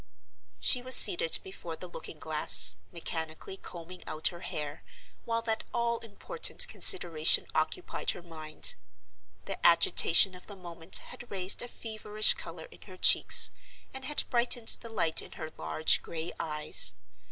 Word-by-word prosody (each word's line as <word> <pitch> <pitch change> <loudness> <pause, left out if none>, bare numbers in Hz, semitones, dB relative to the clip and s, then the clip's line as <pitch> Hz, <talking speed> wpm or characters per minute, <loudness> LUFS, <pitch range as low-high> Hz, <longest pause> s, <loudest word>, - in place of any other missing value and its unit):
She 250 - 0
was 255 +1 0
seated 460 +7 +6
before 385 -1 -11
the - - -12
looking - - -12
glass, - - +6
mechanically 160 0 -8
combing 180 -1 -14
out 155 +1 -3
her 170 - -14
hair, 155 -5 -8 0.4
while 230 0 -5
that 225 -1 -5
all 235 -1 -3
important 235 - -2
consideration 165 - +3
occupied 365 - -5
her 175 - -5
mind. 155 -2 -5 0.7
The - - -9
agitation 170 +2 +2
of 180 - -16
the 205 - -13
moment 170 -2 -6 0.2
had 245 -1 -14
raised 190 -1 +2
a 245 - -8
feverish 215 -2 0
color - - -12
in - - -20
her - - -15
cheeks, - - +5 0.4
and 265 0 -10
had 295 +2 -4
brightened 240 -1 0
the 230 - +2
light 165 -8 -2
in - - -14
her 155 - -11
large 80 - -2
gray 165 +1 -9
eyes. 150 - 0
185 Hz, 150 wpm, -26 LUFS, 160-235 Hz, 0.7 s, seated